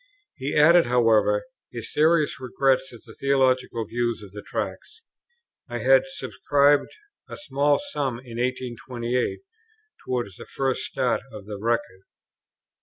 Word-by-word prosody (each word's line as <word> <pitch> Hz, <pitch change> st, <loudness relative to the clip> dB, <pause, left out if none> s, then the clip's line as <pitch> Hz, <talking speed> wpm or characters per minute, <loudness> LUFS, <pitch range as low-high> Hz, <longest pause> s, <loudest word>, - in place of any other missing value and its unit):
He 135 Hz, +3 st, -3 dB
added, 165 Hz, 0 st, +6 dB
however, 120 Hz, -, +3 dB, 0.3 s
his -, -, -7 dB
serious 155 Hz, -2 st, +3 dB
regret 130 Hz, +1 st, +2 dB
at 120 Hz, -, -13 dB
the -, -, -13 dB
theological 130 Hz, -4 st, +1 dB
views 120 Hz, 0 st, -2 dB
of 100 Hz, -, -12 dB
the 105 Hz, +1 st, -8 dB
Tracts. 455 Hz, -, -6 dB, 0.7 s
I -, -, -3 dB
had -, -, +4 dB
subscribed 145 Hz, -, +2 dB, 0.4 s
a -, -, -7 dB
small 145 Hz, -, +1 dB
sum 145 Hz, -, -3 dB
in 120 Hz, -2 st, -10 dB
1828 125 Hz, -, -2 dB, 0.6 s
towards 120 Hz, -7 st, -3 dB
the -, -, -11 dB
first 135 Hz, -1 st, -1 dB
start 130 Hz, -2 st, 0 dB
of 105 Hz, -2 st, -10 dB
the 105 Hz, -1 st, -7 dB
Record. 115 Hz, -4 st, -1 dB
130 Hz, 130 wpm, -25 LUFS, 120-145 Hz, 0.7 s, added